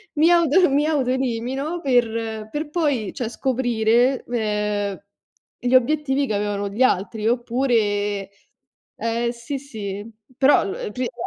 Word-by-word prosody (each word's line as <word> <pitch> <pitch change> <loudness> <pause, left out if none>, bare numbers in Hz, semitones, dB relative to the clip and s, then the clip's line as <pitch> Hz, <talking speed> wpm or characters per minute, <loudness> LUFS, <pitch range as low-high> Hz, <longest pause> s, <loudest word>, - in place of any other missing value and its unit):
Mi 310 +3 +4
auto 345 +1 +4
mi 285 +2 +2
autoelimino 265 +2 -1
per 225 -5 0
per 295 +4 -4
poi, 290 - -1
cioè, 240 -3 -3
scoprire, 245 0 +1
uhm, 210 -3 -1 0.6
gli 245 +1 -1
obiettivi 280 +1 +2
che 220 - -2
avevano 205 0 -1
gli 205 +5 -5
altri 215 -2 +1
oppure 225 -5 0 0.7
ehm, 230 +1 -1
sì, 240 +4 -5
sì, 210 -6 -7 0.3
però, 275 -2 +5
uhm, 195 - -4
prima 250 +1 -3
240 Hz, 125 wpm, -22 LUFS, 215-270 Hz, 0.7 s, però